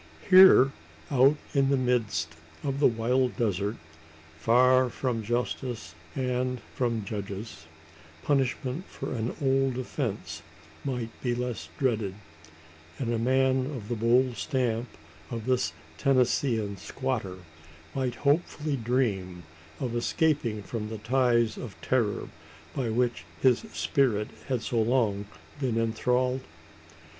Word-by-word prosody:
Here 185 -8 +9 0.4
out 135 +2 +5 0.2
in 135 -2 +3
the 140 - +3
midst 110 -10 0 0.3
of 140 -1 -2
the 145 - +6
wild 125 +2 +1
desert 105 -2 0 0.6
far 125 +3 +5
from 120 -2 -2
justice 120 - -3 0.2
and 125 -1 -1
from 115 -4 -1
judges 100 -3 -6 0.6
punishment 135 +3 0
for - - -6
an 115 0 -2
old 135 -2 +2
offence 125 -4 -4 0.4
might 125 -4 -3
be 120 -2 0
less 120 -10 -4
dreaded; 110 -7 0 0.8
and 120 -3 -1
a 115 - 0
man 130 +2 +2
of 125 -7 -6
the 120 - 0
bold 120 +2 +3
stamp 125 -5 -1 0.4
of 115 -2 -5
this 125 -11 +1 0.3
Tennesseean 120 - +2
squatter 110 -3 -3 0.6
might 130 -3 -1
hopefully 150 -1 +1
dream 105 -8 -1 0.4
of 125 -4 -2
escaping 120 - +1
from 110 0 -4
the 110 - -5
ties 120 0 +2
of 115 -6 -8
terror 115 -6 0 0.5
by 125 -4 -1
which 120 +1 0 0.2
his 130 -3 +4
spirit 110 -7 +1 0.2
had 125 -3 -1
so 115 -2 +1
long 110 -4 +1 0.3
been 125 -5 0
enthralled? 125 +3 +1
125 Hz, 120 wpm, -28 LUFS, 110-130 Hz, 0.8 s, Here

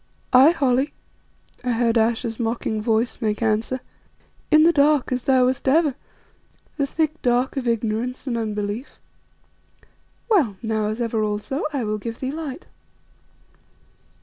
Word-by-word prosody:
"Aye 260 +4 +8
Holly," 270 -3 +1 0.7
I 250 -1 0
heard 230 0 +1
Ayesha's 230 0 0
mocking 225 -2 -2
voice 225 +3 0
make 215 0 -1
answer, 225 +4 0 0.7
"in 310 0 +6
the 335 - +6
dark, 290 -3 +3
as 255 0 0
thou 260 0 +3
wast 260 +1 -1
ever, 295 +1 +3 0.8
the 280 -2 0
thick 315 +1 -1
dark 245 +3 +1
of 260 -3 -3
ignorance 230 +3 -1
and 250 -3 -2
unbelief. 215 +2 -4 1.3
Well, 300 - +2
now, 220 -1 0
as 215 +2 -3
ever 225 -2 0
also, 210 +7 -2
I 275 -4 -2
will 215 0 -2
give 230 +2 -6
thee 260 0 -3
light." 305 0 -6
245 Hz, 140 wpm, -22 LUFS, 220-275 Hz, 1.3 s, Aye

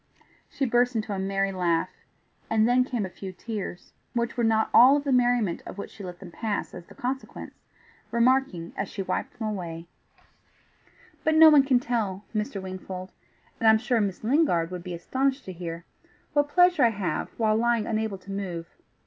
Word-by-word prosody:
She 275 - -2
burst 245 0 +2
into 215 -2 -2
a 195 - -3
merry 195 0 0
laugh, 175 -3 0 0.6
and 220 0 +3
then 250 +1 +4
came 245 -5 -2
a - - -6
few 190 +2 -8
tears, 200 -1 -7 0.2
which 235 0 -1
were 240 - 0
not 220 -1 +2
all 260 +4 +8
of 285 - -3
the 280 - -1
merriment 245 -7 +2
of - - -8
which 200 - -7
she 205 - -11
let 180 -1 -7
them 185 -3 -10
pass 215 +2 -3
as 175 -1 -10
the - - -15
consequence, 265 +2 -5 0.6
remarking, 235 -8 +1
as - - -3
she 195 - -4
wiped - - -3
them 220 - -3
away, 170 -4 -5 1.4
"But 315 - +2
no 315 0 +9
one 295 -2 +8
can 270 -2 +3
tell, 220 -6 -2
Mr. 210 -2 -2
Wingfold, 185 0 -7 0.5
and 225 - +2
I'm 220 - +7
sure 230 0 +1
Miss 200 -1 -3
Lingard 225 - +2
would 180 -1 -5
be 180 -1 -5
astonished 265 +10 -1
to 185 - -6
hear 170 -1 -7 0.5
what 290 0 +2
pleasure 355 -2 +4
I 235 - +6
have 190 -8 -3
while 220 -2 +2
lying 235 -1 +1
unable 220 -3 -2
to 195 +1 -11
move. 180 -4 -5
215 Hz, 190 wpm, -26 LUFS, 185-245 Hz, 1.4 s, no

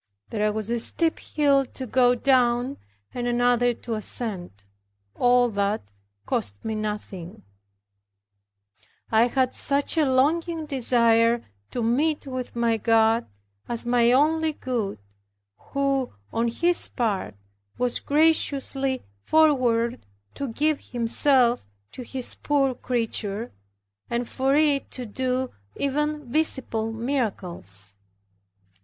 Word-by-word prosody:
There 210 -1 +1
was 215 +1 -4
a 235 - 0
steep 325 +7 0
hill 285 -2 +2
to 260 0 -8
go 250 +1 +3
down 250 +1 +2 0.4
and 245 0 -3
another 245 0 +3
to 235 - -6
ascend. 195 - -4 0.5
All 245 0 +4
that 200 - -1 0.3
cost 100 0 -3
me 220 - -2
nothing; 210 -4 -5 1.7
I 225 +2 +5
had 255 0 0
such 285 +3 +1
a 305 - +4
longing 320 +5 +1
desire 235 -4 +2 0.2
to 240 - -3
meet 290 +8 +1
with 255 -3 -5
my 235 -1 +1
God, 225 +1 +3 0.4
as 235 0 -1
my 240 0 +3
only 315 +4 +3
good, 240 - -3 0.6
who 275 -2 -1 0.2
on 230 +1 +1
His 340 +9 +2
part 205 - -2 0.4
was 250 -1 +1
graciously 280 -3 +1 0.2
forward 250 - +2 0.3
to 280 - -4
give 295 +5 0
Himself 245 - +3 0.2
to - - -8
His 250 +1 -3
poor 275 -3 +1
creature, 230 -3 -2 0.6
and 235 0 -1
for 270 +1 +1
it 295 -2 +2
to 250 - -4
do 255 +3 -2 0.2
even 295 +1 -1
visible 250 -7 0
miracles. 190 - -2
245 Hz, 110 wpm, -25 LUFS, 225-275 Hz, 1.7 s, I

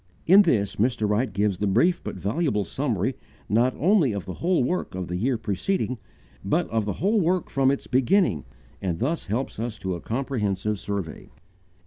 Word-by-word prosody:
In 190 +4 +8
this, 100 - +1
Mr. 110 -1 +1
Wright 105 +5 +1
gives 100 -1 0
the 105 - 0
brief 170 - +2
but - - -5
valuable 105 - -1
summary 130 -4 -1 0.3
not 120 +5 +2
only 165 - +3
of 100 -4 -4
the 95 - -5
whole 175 - +1
work 175 - -2
of 90 -2 -4
the 90 - -2
year 120 +7 0
preceding, 115 - -2 0.4
but 155 - +1
of 110 -2 0
the 100 - -1
whole 205 - +1
work 180 +2 0
from 135 -1 +3
its 140 - -1
beginning, 130 - +2 0.4
and 90 -4 -1
thus 150 - -2
helps 115 +3 -3
us 115 -1 -3
to 95 -1 -3
a 85 - -5
comprehensive 105 -5 -2
survey. 100 -6 -5
115 Hz, 180 wpm, -25 LUFS, 100-145 Hz, 0.4 s, In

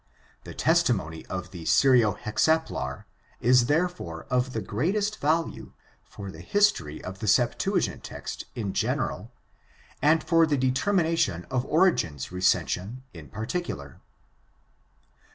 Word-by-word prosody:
The - - -9
testimony 80 +1 +1
of 90 -1 -5
the 85 -3 -8
Syro 125 -4 +4
Hexaplar 105 - -1 0.3
is 120 0 +4
therefore 150 - -1
of 125 +1 +1
the 110 - -1
greatest 195 - -1
value 160 +3 -1 0.3
for 100 -1 -9
the 80 - -11
history 90 - +1
of 95 +1 -7
the 110 - -4
Septuagint 115 +4 +1
text - - -7
in 105 -5 -3
general - - -2 0.7
and 155 +3 +4
for 165 -1 +4
the 145 -2 +1
determination 135 - +1
of 130 0 0
Origen's 85 - +1
recension 95 +5 0
in 80 -6 -11
particular. 110 - -5
125 Hz, 115 wpm, -26 LUFS, -, 0.7 s, Syro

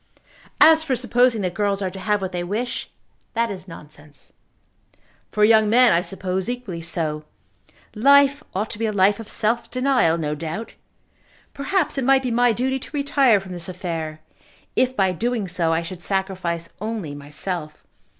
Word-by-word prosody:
"As 320 0 +7
for 295 -5 -1
supposing 245 -2 +2
that 180 -1 -2
girls 200 +1 0
are 190 -2 -2
to 190 - -9
have 205 0 0
what 190 - -3
they 175 -1 -3
wish, 215 +7 -3 0.5
that 230 -1 +1
is 190 -1 -8
nonsense." 150 -3 -14 1.0
"For 210 - +1
young 220 -1 +5
men 245 0 +6
I 170 - +3
suppose 190 +1 -3
equally 240 -9 -5
so. 160 -2 -2 0.7
Life 280 +5 +4
ought 210 +3 -2
to 210 - -7
be 225 - 0
a - - -1
life 200 +1 +3
of 225 -1 -9
self 230 +2 0
denial, 255 -10 +2
no 150 -2 -2
doubt. 165 +9 -5 0.8
Perhaps 295 +1 -1
it - - -1
might 265 +1 +4
be 250 - -1
my 245 +1 +3
duty 260 +4 -1
to 295 - -7
retire 280 -6 +3
from 190 -1 -11
this 175 0 -6
affair, 165 -4 -5 0.5
if 255 0 +2
by 190 -1 +3
doing 225 +2 -2
so 170 -2 0
I 165 +1 0
should 175 +1 -8
sacrifice 185 -3 -2
only 215 -9 -4
myself. 150 +2 -5
200 Hz, 170 wpm, -22 LUFS, 175-245 Hz, 1.0 s, As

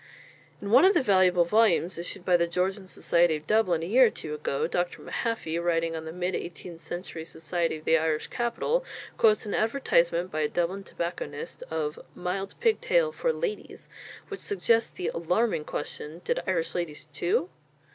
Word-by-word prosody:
In 200 - -4
one 235 - +7
of 385 +2 +6
the - - +3
valuable 185 -4 +4
volumes 190 -3 +3
issued 175 +1 -6
by 180 - +4
the 170 0 +3
Georgian 185 +3 -1
Society 170 -2 +2
of 155 0 -7
Dublin 185 -5 +2
a - - -2
year 245 +7 +6
or - - +1
two 155 -6 -7
ago, 150 -2 -1
Dr. 175 +1 -2
Mahaffy, 195 -8 -2
writing 165 -1 +1
on 160 0 -5
the 160 - -5
mid 180 +2 -2
eighteenth 170 -1 -6
century 175 -2 -6
society 165 +1 -2
of 155 - -15
the 165 - +4
Irish 155 -1 0
capital, 245 - -1 0.4
quotes 215 -1 +4
an 205 - -4
advertisement 180 -7 +1
by 155 - -2
a 150 - +2
Dublin 180 +3 -1
tobacconist 170 -6 -5
of 155 -1 -2 0.2
"mild 195 +2 -3
pigtail 485 +1 +2
for - - 0
ladies" 470 -3 -5 0.4
which 400 - -6
suggests 230 - +1
the 180 - -4
alarming 180 +1 0
question 150 +3 -5
Did - - 0
Irish 170 -3 0
ladies 170 -4 -4
chew? 175 +3 0
175 Hz, 175 wpm, -27 LUFS, 165-215 Hz, 0.4 s, one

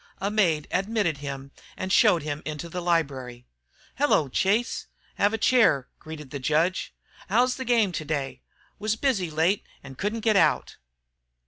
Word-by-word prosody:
A 200 +1 -2
maid 170 -8 +2
admitted 195 -6 0
him 140 -1 -6 0.3
and 185 0 -2
showed 170 -3 +5
him 150 0 -4
into 155 +3 -5
the 180 +2 -4
library. 135 -8 -1 0.5
"Hello, 220 - +3
Chase, 210 - 0 0.3
have 205 - +4
a 225 - -1
chair," 220 - +3
greeted 150 -4 -9
the 140 - -4
judge. 160 +7 0 0.4
"How's 245 +5 +3
the 260 - -5
game 230 -5 +3
today? 140 -6 -3 0.4
Was 215 +1 0
busy 220 -8 0
late 165 +6 +1 0.2
and 135 -1 -11
couldn't 215 +3 -2
get 220 -1 +2
out." 195 - +2
170 Hz, 150 wpm, -26 LUFS, 145-210 Hz, 0.5 s, showed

